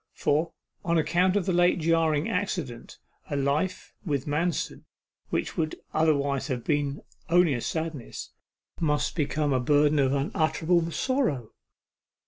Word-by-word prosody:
For, 155 +3 +1 0.3
on 170 -1 +1
account 175 +5 +2
of 200 -4 +1
the 185 - 0
late 175 +1 +4
jarring 160 -2 +2
accident, 180 - -3 0.3
a - - -2
life 145 +7 -1
with 145 -7 -1
Manston 160 +4 -1 0.4
which - - -2
would 155 -1 -1 0.2
otherwise 140 -3 +1
have 125 -5 -3
been 145 -2 -1 0.3
only 175 -2 +4
a 120 - -2
sadness, 160 -4 -4 0.5
must 150 -2 0
become 150 -2 0
a 130 - +2
burden 145 +3 +3
of 135 -1 +3
unutterable 160 +4 +1
sorrow. 170 - -1
155 Hz, 130 wpm, -27 LUFS, 140-170 Hz, 0.5 s, late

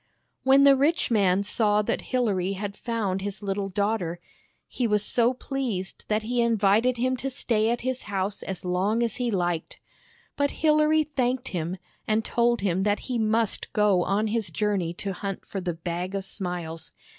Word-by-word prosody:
When 270 +1 +5
the 280 -1 +7
rich 285 +1 +2
man 200 -3 +3
saw 210 0 +2
that - - -1
Hilary 200 -7 +1
had 200 +1 -5
found 210 -5 -2
his 200 +1 -5
little 195 0 -2
daughter, 195 -3 -1 0.5
he 245 - -1
was 210 -1 +2
so 240 0 +3
pleased 245 -8 -4
that 215 0 0
he 240 +2 0
invited 230 +2 +3
him 255 +2 +1
to 270 +2 -3
stay 225 -4 0
at 240 0 -1
his 255 0 -2
house 195 0 -2
as 190 -2 -6
long 195 +6 +1
as 235 +1 -2
he 245 -2 -1
liked. 175 -5 -2 0.6
But 285 0 +1 0.2
Hilary 305 0 +4
thanked 260 -3 -1
him, 175 +1 -3 0.3
and 215 +1 +1
told 235 -1 +2
him 190 -2 +1
that 205 +1 +1
he 250 -3 -2
must 220 0 0
go 210 -4 +3
on 200 +4 +1
his 220 -1 -1
journey 200 -5 0
to 195 +2 -4
hunt 195 +1 -5
for 195 - -5
the 180 -1 -2
Bag 175 +3 -4
of 195 -1 -2
Smiles. 175 -5 -4
210 Hz, 180 wpm, -26 LUFS, 190-240 Hz, 0.6 s, the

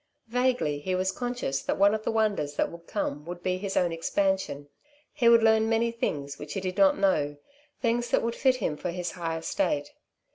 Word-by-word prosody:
Vaguely 245 - +1
he 185 +5 -2
was 185 +1 0
conscious 245 - -3
that - - -2
one 200 +1 +5
of 215 0 -2
the - - -1
wonders 205 -10 0
that - - 0
would 170 0 -12
come 150 -8 -3
would 175 +1 -7
be 185 0 0
his 195 0 -3
own 175 -2 +2
expansion. 165 -3 -1 0.5
He 240 -5 +4
would 230 -1 +6
learn 220 0 +4
many 230 +1 +2
things 145 -11 -3
which 150 - -7
he - - 0
did 185 -1 -3
not 195 -1 +5
know, 150 -7 +1 0.4
things 240 -1 +1
that - - +2
would 230 0 -1
fit 260 +1 +3
him 155 -11 -2
for 180 - -4
his 180 0 -3
high 165 -2 -3
estate. 145 -3 -1
190 Hz, 210 wpm, -27 LUFS, 165-225 Hz, 0.5 s, would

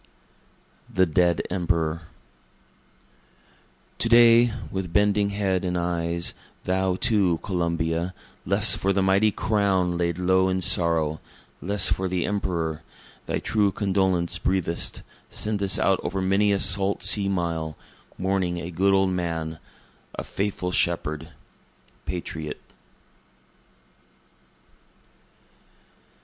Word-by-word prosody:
The 95 - +2
Dead 85 +1 +1
Emperor 85 -3 -1 1.9
To 115 - +1
day, 120 0 +6 0.2
with 95 -3 -4
bending 105 +2 +2
head 100 -2 -1
and 90 -1 -2
eyes, 85 0 -1 0.3
thou, 95 0 0
too, 95 -4 +2
Columbia, 85 -1 -2 0.3
Less 100 +3 +5
for 100 +1 0
the 95 0 +1
mighty 95 +3 +3
crown 95 -5 0
laid 85 -1 -1
low 95 +1 +2
in 95 0 -1
sorrow 80 -3 +2 0.4
less 100 +1 +3
for 95 - 0
the 90 -1 -1
Emperor, 85 -6 -2 0.5
Thy - - -1
true 105 -3 0
condolence 95 -4 0
breathest, 90 -3 -1 0.3
sendest 100 -3 0
out 95 -1 +1
o'er 95 +2 -3
many 100 +2 +2
a 100 - +1
salt 100 +1 +3
sea 100 -2 +3
mile, 85 -4 -3 0.4
Mourning 95 -2 -1
a 85 +1 -6
good 95 +3 +2
old 95 -1 +2
man 80 -3 -3 0.6
a - - -5
faithful 95 -2 -3
shepherd, 80 -3 -1 0.8
patriot. 80 -3 -5
95 Hz, 110 wpm, -24 LUFS, 85-100 Hz, 1.9 s, day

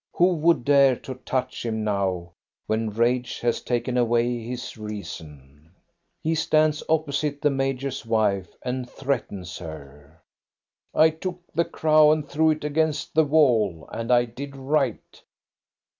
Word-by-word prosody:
Who 180 +1 +4
would 165 -4 +2
dare 140 -2 +5
to 130 - -8
touch 130 0 -3
him 110 -2 -2
now, 95 -4 -1 0.3
when 110 0 -1
rage 120 +3 0
has 120 -1 0
taken 120 0 -1
away 120 0 +1
his 125 +2 -6
reason? 80 - -9 0.5
He 160 - +1
stands 155 -1 +2
opposite 150 -2 0
the 145 - +2
major's 135 -1 -2
wife 105 -5 +1
and 125 0 -3
threatens 100 - -4
her. 75 -1 -11 0.4
" - - -69 0.3
I 160 +1 +6
took 175 +2 -6
the 170 +2 +2
crow 155 -1 +4
and 155 -1 0
threw 160 +1 +2
it 155 -1 0
against 150 0 -1
the 160 0 +4
wall. 120 - +2
And 115 +2 -3
I 120 0 +5
did 135 +4 -8
right." 135 -3 -2
125 Hz, 145 wpm, -24 LUFS, 110-150 Hz, 0.5 s, I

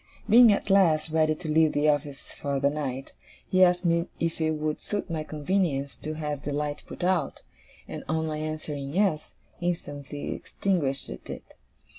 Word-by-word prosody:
Being, 235 0 +8
at 200 0 0
last, 165 -5 +4
ready 155 -1 +3
to 160 +1 -7
leave 155 0 +4
the 145 +1 +2
office 145 -2 -1
for 140 -1 -2
the 140 +1 +2
night, 135 -3 -4 0.3
he 185 0 +5
asked 180 0 +3
me 170 +1 +2
if 165 0 -1
it 160 0 +2
would 155 0 -2
suit 205 -4 -3
my 160 -2 -1
convenience 150 -2 -1
to 155 +1 -5
have 150 -2 -3
the 145 - -3
light 145 0 -2
put - - -7
out; 180 -1 0 0.4
and - - -6
on 160 0 0
my 155 -1 -3
answering 155 -2 -4
'Yes,' 190 -6 +1 0.2
instantly 145 -5 -3
extinguished 150 -9 -1
it. - - -8
155 Hz, 170 wpm, -27 LUFS, 145-175 Hz, 0.4 s, Being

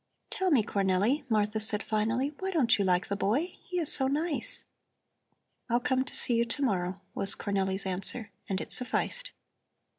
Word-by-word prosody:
"Tell 380 0 -1
me, 270 -10 +3
Cornelli," 205 +9 -1
Martha 210 -1 0
said 215 -1 +4
finally, 225 +7 -2
"why 380 - -3
don't 265 - +2
you - - +1
like 180 -1 +1
the 200 - -4
boy? 260 - -1
He 360 - -6
is 325 -4 +9
so 265 - +2
nice!" 300 +3 -1 1.0
"I'll 240 +1 +2
come 260 0 0
to - - -5
see 245 - +2
you 235 0 +2
to 280 +5 -3
morrow," 190 -5 -2
was 195 - +2
Cornelli's 195 -1 -3
answer, 195 +4 +1 0.2
and 190 -1 -2
it - - -8
sufficed. - - -2
225 Hz, 175 wpm, -28 LUFS, 200-280 Hz, 1.0 s, is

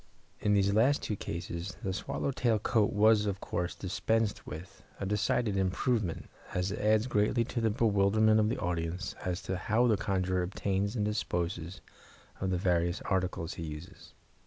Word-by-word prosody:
In 105 0 +2
these 100 0 +3
last 125 +7 +3
two 105 - -1
cases, 85 +1 -5
the 95 - -1
swallow 140 - -2
tail 120 -4 +2
coat 105 0 +2
was, 105 0 +4
of 100 -1 -2
course, 90 -2 -3
dispensed 110 +3 -1
with, 90 +6 -9 0.2
a 100 - -2
decided 105 +1 +1
improvement, 95 0 0 0.3
as 90 +2 0
it 105 - -4
adds 110 +1 +3
greatly 115 0 +2
to 120 0 -3
the 115 - +3
bewilderment 110 0 +3
of 105 0 +3
the - - -1
audience 85 0 -2
as 90 0 -2
to 95 0 -2
how 110 +6 +2
the 110 -4 +3
conjurer 95 -2 0
obtains 100 +3 -1
and 105 -3 0
disposes 90 -4 -2 0.6
of 95 - -1
the 90 - +1
various 85 -1 +1
articles 90 -3 -1
he 85 - -6
uses. 80 +5 -9
100 Hz, 170 wpm, -31 LUFS, 90-110 Hz, 0.6 s, was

